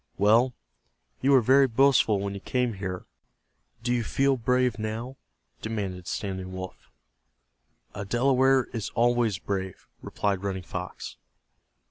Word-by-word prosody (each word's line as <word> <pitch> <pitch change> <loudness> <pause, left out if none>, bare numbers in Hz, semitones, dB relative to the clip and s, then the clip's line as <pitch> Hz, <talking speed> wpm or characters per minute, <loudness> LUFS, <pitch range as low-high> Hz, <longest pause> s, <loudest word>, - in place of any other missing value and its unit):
"Well, 115 +5 +4 0.7
you 135 - +2
were 135 -2 +6
very 135 +3 +5
boastful 120 -4 +3
when 100 0 -3
you 100 - -6
came 125 +2 -1
here; 95 -2 -5 0.8
do 120 0 +1
you 120 -1 0
feel 135 +4 +2
brave 125 -1 +1
now?" 115 +5 -4 0.4
demanded 95 -5 -4
Standing 95 -2 -4
Wolf. 95 0 -8 1.0
"A 100 - -5
Delaware 130 +4 +3
is 115 -4 -3
always 120 -3 +2
brave," 95 -1 -5
replied 100 -2 -2
Running 95 -2 -3
Fox. - - -7
110 Hz, 125 wpm, -27 LUFS, 100-125 Hz, 1.0 s, were